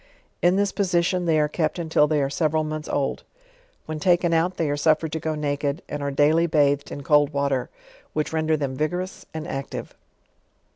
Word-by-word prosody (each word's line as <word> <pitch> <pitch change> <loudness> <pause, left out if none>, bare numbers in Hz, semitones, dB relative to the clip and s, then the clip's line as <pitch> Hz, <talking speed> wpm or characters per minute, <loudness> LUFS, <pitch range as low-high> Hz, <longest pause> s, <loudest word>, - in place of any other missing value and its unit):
In 175 +1 +4
this 200 0 +1
position 180 -2 +1
they 160 -2 +3
are 150 - +3
kept 155 +2 -1
until 160 -3 +2
they 150 -2 +1
are 135 - 0
several 155 0 +1
months 155 0 -5
old. 140 -1 -1 0.6
When 155 0 -5
token 175 0 +3
out 175 +3 +1
they 165 - 0
are - - 0
suffered 155 +1 +2
to 160 - -2
go 160 0 -2
naked, 145 0 -2
and 145 - -5
are 140 - -1
daily 155 +4 +3
bathed 145 -3 +2
in 140 - -6
cold 145 0 +4
water, 140 -2 0 0.4
which 155 +1 -2
render 160 0 +1
them 140 -3 -2
vigorous 180 +6 -3
and 160 +1 -6
active. 135 -3 -5
155 Hz, 190 wpm, -24 LUFS, 145-165 Hz, 0.6 s, In